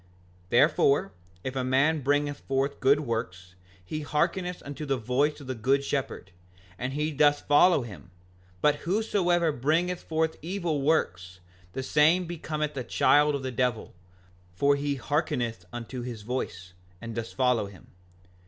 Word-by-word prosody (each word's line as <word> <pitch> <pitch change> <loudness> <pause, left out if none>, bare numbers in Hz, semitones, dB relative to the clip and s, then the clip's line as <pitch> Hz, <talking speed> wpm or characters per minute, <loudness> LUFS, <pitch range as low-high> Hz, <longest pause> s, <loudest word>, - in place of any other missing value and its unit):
5:41 - - -31
Therefore, 140 -3 +3 0.3
if 130 0 -4
a 130 - -1
man 140 +5 +2
bringeth 145 +1 0
forth 135 +1 -1
good 140 +3 +4
works 95 -8 -4 0.3
he 155 +11 -4
hearkeneth 175 +4 -1
unto 145 +1 -6
the 140 -2 0
voice 130 +6 0
of 140 - -10
the 130 - -3
good 135 +4 +1
shepherd, 135 -9 -3 0.5
and 130 +3 -3
he 150 +2 -1
doth 145 0 +3
follow 145 0 +5
him; 90 -8 -11 0.5
but 150 0 +4
whosoever 175 -2 +1
bringeth 160 +7 0
forth 160 0 -1
evil 170 -3 -2
works, 95 - 0 0.3
the 130 - -3
same 160 +7 +3
becometh 155 -3 -4
a 130 - -3
child 145 +4 +3
of 140 - -4
the 130 - -3
devil, 125 -2 -1 0.6
for 140 +9 +3
he 140 0 -1
hearkeneth 125 - -2
unto 120 +1 -6
his 120 -3 -6
voice, 95 -7 -4 0.3
and 115 +1 -7
doth 115 0 -4
follow 125 -5 +1
him. 100 -2 -14
140 Hz, 155 wpm, -27 LUFS, 120-150 Hz, 0.6 s, follow